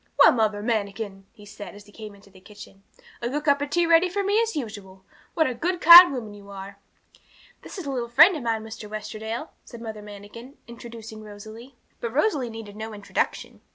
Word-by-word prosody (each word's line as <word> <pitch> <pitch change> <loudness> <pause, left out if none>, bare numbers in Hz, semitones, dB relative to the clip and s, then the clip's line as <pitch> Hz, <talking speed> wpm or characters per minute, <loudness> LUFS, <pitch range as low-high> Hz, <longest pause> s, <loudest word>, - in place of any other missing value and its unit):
'Well, - - +8
Mother 215 -3 0
Manikin,' 200 -3 -3
he 210 -3 -16
said, 205 0 -10
as 205 0 -14
he 205 - -18
came 210 -1 -10
into 200 0 -20
the 185 - -17
kitchen, 205 0 -14 0.4
'a 235 - -2
good 295 +3 -3
cup 285 -1 +2
of 285 - -3
tea 345 +3 +1
ready 335 +2 +4
for 400 +3 -2
me 410 +3 +2
as 455 -1 -2
usual! 200 -7 -7 0.3
What 320 - +3
a 255 - -1
good, 345 +9 -2
kind 345 +1 +10
woman 230 -6 -6
you 200 -1 -14
are!' 200 0 -10 0.8
'This - - -11
is 370 - -6
a 280 - -3
little 240 -3 -3
friend 335 +10 +6
of 305 - -5
mine, 225 -2 -2
Mr. 220 -1 -9
Westerdale,' 215 +5 -6
said 235 - -12
Mother 220 -2 -7
Manikin, 210 +6 -12
introducing 230 -2 -10
Rosalie. 220 +5 -12 0.2
But 235 -1 -5
Rosalie 295 - +1
needed 225 -2 -9
no 220 0 -7
introduction. 205 -1 -3
225 Hz, 205 wpm, -24 LUFS, 205-275 Hz, 0.8 s, kind